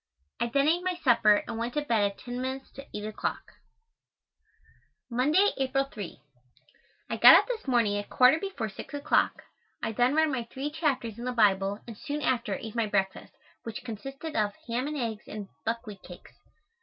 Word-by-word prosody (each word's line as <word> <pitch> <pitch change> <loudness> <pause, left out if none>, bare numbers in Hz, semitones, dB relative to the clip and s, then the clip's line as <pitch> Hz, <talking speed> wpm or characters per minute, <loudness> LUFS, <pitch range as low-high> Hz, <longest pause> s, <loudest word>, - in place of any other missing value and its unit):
I - - +1
then 275 +4 +2
ate 340 +3 +3
my 365 -1 0
supper 235 -10 +4
and 225 - -4
went 235 +3 -3
to 295 - 0
bed 230 -7 +1
at 200 - -19
ten 245 0 -6
minutes 265 +1 -4
to 275 +1 -11
eight 210 - -5
o'clock. 215 0 -4 1.6
Monday, 300 +12 +3
April 270 0 +1
3. 210 - -8 0.9
I - - -1
got - - +10
up - - +5
this 470 - -4
morning 235 -5 +2
at 205 - -7
quarter 255 +5 +5
before 330 - -3
six 215 +7 -8
o'clock. 285 +1 +1 0.4
I - - 0
then 245 +5 +2
read 315 0 +4
my 250 -5 -2
three 280 +3 -4
chapters 275 -8 -1
in 240 - -5
the 250 - -1
Bible, 200 -3 +2
and 230 - -8
soon 295 +5 -4
after 245 -1 0
ate 220 -1 -7
my 230 -2 0
breakfast, 195 -2 -1 0.3
which 230 -1 -7
consisted 270 +7 -7
of 210 -2 +1
ham 245 +3 -1
and 300 0 -3
eggs 225 -5 -4
and 205 -2 -7 0.2
buckwheat 225 -3 -3
cakes. 180 - -13
245 Hz, 185 wpm, -28 LUFS, 215-280 Hz, 1.6 s, got